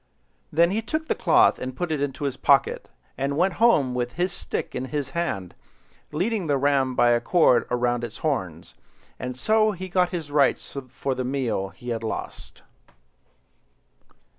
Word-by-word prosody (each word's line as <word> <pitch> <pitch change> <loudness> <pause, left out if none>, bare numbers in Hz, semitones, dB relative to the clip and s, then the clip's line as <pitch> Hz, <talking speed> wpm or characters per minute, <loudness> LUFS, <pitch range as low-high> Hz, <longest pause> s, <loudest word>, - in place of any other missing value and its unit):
Then 170 +3 +4
he 215 +3 0
took 310 +7 -3
the - - +2
cloth - - +4
and 130 0 -5
put 175 +3 -3
it 150 -3 -1
into 145 +1 -3
his 140 -2 -1
pocket, 140 0 +2 0.3
and 140 +1 -1
went 185 +2 +2
home 150 - +4
with 120 -1 -2
his 175 +2 -1
stick - - -5
in 130 - -3
his 140 -1 -3
hand, 100 - -3 0.6
leading 185 +4 -1
the 145 -2 +2
ram 135 -2 +1
by 120 -1 +4
a 120 0 +3
cord 125 -3 +3
round 120 -1 0
its 115 -2 -6
horns; 95 - -2 0.5
and 125 0 -5
so 215 +7 +2
he 185 0 -7
got 180 0 +2
his 165 -5 -5
rights 145 -1 +1
for 130 +2 -3
the 130 - -3
meal 125 -7 -1
he 95 +7 -10
had 115 -2 -2
lost. 110 - -6
140 Hz, 170 wpm, -24 LUFS, 125-175 Hz, 0.6 s, Then